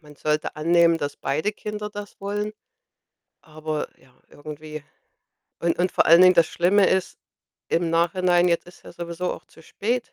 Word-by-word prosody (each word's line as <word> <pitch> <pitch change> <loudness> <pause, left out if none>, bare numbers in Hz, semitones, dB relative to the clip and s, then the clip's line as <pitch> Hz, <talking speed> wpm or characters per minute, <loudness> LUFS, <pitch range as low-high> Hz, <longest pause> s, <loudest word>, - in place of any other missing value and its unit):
man 150 -2 -16
sollte 150 +1 -2
annehmen, 170 +1 +3
dass 145 -2 -4
beide 155 +9 -1
Kinder 210 0 -6
das 205 -1 -9
wollen, 205 +1 -3 0.9
aber 155 -1 -5
ja, 130 -1 -25 0.2
irgendwie 155 0 -9 0.8
und 170 0 0
und 180 +1 +1
vor - - +2
allen 170 +2 +7
Dingen, 185 0 +7
das 170 -2 +5
Schlimme 190 +3 +3
ist, 190 -1 0 0.5
im 170 0 0
Nachhinein, 175 +1 +2
jetzt 170 0 0
ist 175 - -17
ja - - -11
sowieso 170 +1 -4
auch - - -11
zu 160 - -19
spät. 235 +8 -3
170 Hz, 165 wpm, -23 LUFS, 155-185 Hz, 0.9 s, allen